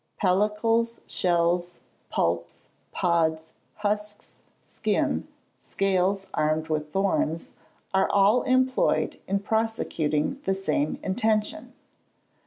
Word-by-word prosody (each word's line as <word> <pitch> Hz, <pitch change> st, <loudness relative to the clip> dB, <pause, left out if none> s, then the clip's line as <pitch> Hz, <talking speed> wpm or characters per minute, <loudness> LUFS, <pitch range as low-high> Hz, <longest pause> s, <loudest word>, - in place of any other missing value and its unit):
Pellicles, 215 Hz, +4 st, +1 dB
shells, 175 Hz, 0 st, +1 dB, 0.3 s
pulps, -, -, -2 dB, 0.2 s
pods, 160 Hz, -3 st, 0 dB, 0.2 s
husks, 210 Hz, 0 st, -3 dB, 0.3 s
skin, -, -, -1 dB, 0.3 s
scales 195 Hz, 0 st, 0 dB
armed 155 Hz, +1 st, 0 dB
with 150 Hz, -1 st, -2 dB
thorns, 180 Hz, -4 st, 0 dB, 0.4 s
are 190 Hz, 0 st, +3 dB
all 205 Hz, +5 st, +4 dB
employed 260 Hz, 0 st, +1 dB
in 200 Hz, -, +1 dB
prosecuting 205 Hz, -, -1 dB
the 195 Hz, -, 0 dB
same 175 Hz, -6 st, -1 dB
intention. 215 Hz, +2 st, -1 dB
195 Hz, 85 wpm, -26 LUFS, 170-210 Hz, 0.4 s, all